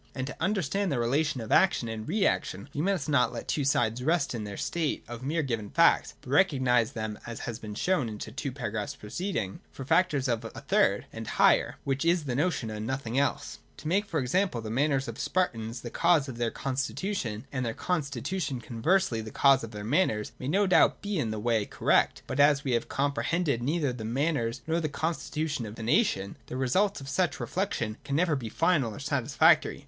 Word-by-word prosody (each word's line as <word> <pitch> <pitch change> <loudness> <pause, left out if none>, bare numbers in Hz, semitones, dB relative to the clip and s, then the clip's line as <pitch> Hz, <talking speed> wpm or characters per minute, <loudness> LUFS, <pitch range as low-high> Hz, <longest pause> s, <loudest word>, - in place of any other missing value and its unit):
And 130 -1 -2
to 140 - -6
understand 195 0 0
the - - +1
rela 120 +6 +2
tion 145 -5 -3
of 110 - -7
action 185 -10 +4
and 110 +3 -5
reaction 165 - 0
we 145 - -2
must 185 -4 0
not 140 -5 +3
let 120 - -5
the - - -15
two 145 - 0
sides 120 -3 +1
rest 160 -1 +1
in 110 -3 -4
their 100 -1 -6
state 165 -3 -2
of 120 +1 -7
mere 155 +5 -1
given 115 -6 -3
facts, - - +3
but 125 - -10
recognise 130 -8 +3
them, 110 -1 -4
as 115 -1 -6
has 115 -1 -5
been 105 -2 -7
shown 150 - +1
in 105 - -6
the 110 - -7
two 140 +2 -4
paragraphs 120 0 -4
preceding, 115 - -4
for 135 - -8
factors 145 -4 +2
of 115 -2 0
a 115 - -5
third - - +1
and - - -6
higher, - - +3
which 135 +1 -1
is 170 0 +2
the 135 -4 -3
notion 140 -5 0
and 110 +1 -5
nothing 130 -1 -1
else. 145 +1 -1 0.2
To 150 - -7
make, 200 +5 +1
for 160 - -1
example, 140 +2 0
the 110 -1 -5
manners 135 +2 +1
of - - -4
the - - -7
Spartans 115 -10 -1
the 120 - -7
cause 170 -5 +3
of 130 -3 -7
their 120 -1 +1
constitution 135 - -3
and 130 -2 -2
their 115 -2 -2
constitution 145 -2 -2
conversely 120 +2 +1
the 110 - -7
cause 135 +3 +4
of 115 - -5
their 105 -2 -7
manners, 110 - +1
may 130 - -5
no 195 +7 +3
doubt 185 - +4
be 205 -3 -1
in 115 -7 -1
a 110 - -3
way 115 -1 +1
cor - - -5
rect. - - +3
But, - - -4
as 145 0 +5
we 135 - -1
have 115 -1 0
comprehended 140 0 0
neither 145 0 0
the 120 -3 -7
manners 120 -1 -1
nor 165 +1 0
the 155 -2 -1
constitution 155 -4 -2
of 105 - -8
the 115 - -7
nation, 110 - +1
the 125 - -5
result 185 +9 +1
of 135 - -9
such 175 +6 0
reflec 195 +2 -2
tions 110 -1 -3
can 140 - -3
never 165 0 +2
be 120 -5 -4
final 140 -7 +1
or - - -8
satisfactory. 145 +4 +3
135 Hz, 220 wpm, -28 LUFS, 115-160 Hz, 0.2 s, as